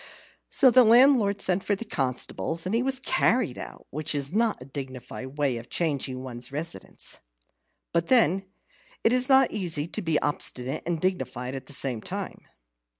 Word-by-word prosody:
So 260 Hz, -3 st, +5 dB
the 255 Hz, +1 st, +7 dB
landlord 230 Hz, -4 st, +5 dB
sent 185 Hz, 0 st, 0 dB
for 205 Hz, -, +1 dB
the 235 Hz, -, -7 dB
constables, 155 Hz, -, -2 dB
and 185 Hz, -, -2 dB
he 230 Hz, -, +2 dB
was 265 Hz, +1 st, 0 dB
carried 250 Hz, -, +1 dB
out, -, -, -8 dB
which 155 Hz, +1 st, -1 dB
is 140 Hz, +2 st, +1 dB
not 225 Hz, 0 st, +1 dB
a 125 Hz, -, -10 dB
dignified 130 Hz, 0 st, -8 dB
way 140 Hz, -5 st, +1 dB
of 115 Hz, +1 st, -10 dB
changing 135 Hz, -6 st, -2 dB
one's 120 Hz, -1 st, -5 dB
residence. 160 Hz, +4 st, -5 dB, 0.7 s
But 170 Hz, 0 st, +1 dB
then 195 Hz, -6 st, +3 dB, 0.6 s
it 225 Hz, -, +4 dB
is 255 Hz, +1 st, +3 dB
not 265 Hz, -1 st, +5 dB
easy 170 Hz, -7 st, -1 dB
to 215 Hz, -, -3 dB
be 165 Hz, -5 st, +1 dB
obstinate 135 Hz, -2 st, -1 dB
and 170 Hz, -2 st, -1 dB
dignified 130 Hz, -8 st, -2 dB
at 135 Hz, -1 st, -7 dB
the -, -, -7 dB
same 130 Hz, -4 st, -2 dB
time. -, -, -6 dB
165 Hz, 170 wpm, -26 LUFS, 130-215 Hz, 0.7 s, the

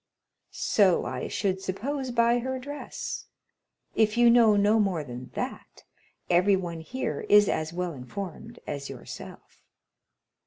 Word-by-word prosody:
"So 195 Hz, -5 st, +2 dB
I 125 Hz, 0 st, -3 dB
should 190 Hz, -2 st, -1 dB
suppose 260 Hz, +8 st, -3 dB
by 235 Hz, 0 st, +3 dB
her 260 Hz, +2 st, -3 dB
dress; 285 Hz, +3 st, -6 dB, 0.7 s
if 220 Hz, 0 st, +2 dB
you 240 Hz, 0 st, +7 dB
know 230 Hz, -3 st, +6 dB
no 205 Hz, +2 st, +4 dB
more 190 Hz, -7 st, +1 dB
than 125 Hz, -1 st, -8 dB
that, -, -, -6 dB, 0.4 s
everyone 180 Hz, -1 st, +2 dB
here 160 Hz, -, -4 dB
is 205 Hz, 0 st, +7 dB
as 155 Hz, 0 st, -1 dB
well 180 Hz, 0 st, -3 dB
informed 195 Hz, -, -7 dB
as 140 Hz, -1 st, -5 dB
yourself." 130 Hz, -3 st, -10 dB
200 Hz, 125 wpm, -27 LUFS, 170-235 Hz, 0.7 s, you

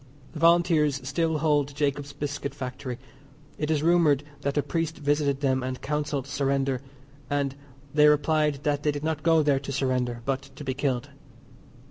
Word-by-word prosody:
The 155 Hz, -, -6 dB
Volunteers 165 Hz, -4 st, +4 dB
still 160 Hz, +3 st, 0 dB
hold 145 Hz, -2 st, +1 dB
Jacob's 145 Hz, -1 st, -1 dB
Biscuit 145 Hz, -1 st, -4 dB
Factory. 125 Hz, -2 st, -5 dB, 0.6 s
It 150 Hz, -, -1 dB
is 155 Hz, -2 st, +1 dB
rumoured 160 Hz, -4 st, +4 dB, 0.2 s
that 140 Hz, +1 st, -2 dB
a 145 Hz, -, +3 dB
priest 165 Hz, -1 st, -2 dB
visited 145 Hz, -1 st, 0 dB
them 130 Hz, -2 st, +2 dB
and 130 Hz, 0 st, -4 dB
counselled 150 Hz, -2 st, -2 dB
surrender, 135 Hz, -2 st, 0 dB, 0.5 s
and 140 Hz, -1 st, 0 dB, 0.4 s
they 150 Hz, 0 st, +6 dB
replied 150 Hz, -1 st, +2 dB
that 145 Hz, -1 st, 0 dB
they 150 Hz, -, +2 dB
did 145 Hz, 0 st, -5 dB
not 155 Hz, -1 st, -1 dB
go 165 Hz, 0 st, +4 dB
there 145 Hz, -2 st, +3 dB
to 140 Hz, 0 st, -6 dB
surrender 125 Hz, -3 st, -1 dB
but 135 Hz, -1 st, 0 dB
to 145 Hz, -, -8 dB
be 130 Hz, -2 st, -2 dB
killed. 130 Hz, -3 st, -2 dB
145 Hz, 165 wpm, -26 LUFS, 135-150 Hz, 0.6 s, they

